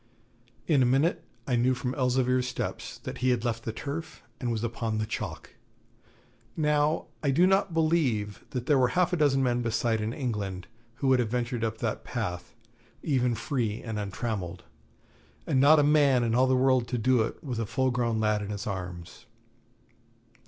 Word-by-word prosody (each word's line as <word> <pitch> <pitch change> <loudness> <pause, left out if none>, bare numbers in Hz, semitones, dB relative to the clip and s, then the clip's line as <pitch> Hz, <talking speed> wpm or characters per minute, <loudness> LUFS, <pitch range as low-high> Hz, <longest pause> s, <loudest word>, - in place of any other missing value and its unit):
In 150 -5 +3
a - - +5
minute 160 +6 +2 0.2
I 125 - 0
knew 125 +2 +2
from 125 +1 -3
Elzevir's 125 -1 +1
steps 125 - -4
that - - -6
he 130 +1 +2
had 125 -1 +1
left 115 -1 -2
the 110 - -2
turf 155 +7 -6 0.2
and 120 -2 -2
was 115 -1 -2
upon 115 -1 -2
the 110 - -1
chalk. 110 - -5 1.1
Now 150 0 +1 0.2
I 145 - 0
do 160 +7 +4
not 195 0 +2
believe 140 -11 +1
that 125 -2 -4
there 140 -1 +3
were 125 - +4
half 180 0 +3
a - - +4
dozen 140 -4 +3
men 125 -1 +1
beside 115 -1 0
in 110 +1 -2
England 105 -9 -3 0.3
who 135 - -2
would 130 -1 +4
have 120 -3 0
ventured 120 0 -2
up 110 -1 -1
that 115 -1 -3
path, 95 -8 -5 0.5
even 125 -5 +1
free 115 -2 -2
and 110 -2 -4
untrammelled, 100 -3 -4 0.8
and 130 - +1
not 150 +3 +7
a 150 - +5
man 145 -4 +4
in 115 -1 0
all 130 +2 +4
the 130 - +3
world 130 -2 +3
to 125 - -2
do 125 +1 +3
it 110 - -4
with 125 -6 -4
a 115 - -2
full 130 +3 +1
grown 120 -2 0
lad 105 -1 +1
in 100 - -5
his 100 -1 -4
arms. 90 -3 -6
125 Hz, 190 wpm, -28 LUFS, 110-135 Hz, 1.1 s, not